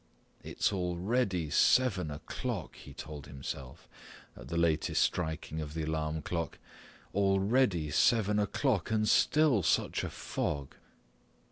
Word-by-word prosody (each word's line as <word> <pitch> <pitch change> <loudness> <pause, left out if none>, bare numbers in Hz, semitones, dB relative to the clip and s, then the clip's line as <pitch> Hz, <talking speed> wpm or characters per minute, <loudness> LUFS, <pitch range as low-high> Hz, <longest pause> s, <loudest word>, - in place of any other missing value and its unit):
"It's - - -1
already 90 - -1
seven 100 -11 +3
o'clock," 75 +1 -5
he - - -12
told 75 -2 -8
himself 65 -2 -7 0.5
at - - -11
the 85 - -3
latest 85 -2 +2
striking 80 -2 -2
of 75 0 -7
the 80 - -2
alarm 80 0 -2
clock, 85 -3 -3 0.6
"already 95 - +2
seven 105 - +3
o'clock 105 - 0
and 110 -1 +1
still 150 -6 +4
such - - +1
a - - -3
fog." 70 -2 -3
85 Hz, 120 wpm, -31 LUFS, 75-105 Hz, 0.6 s, still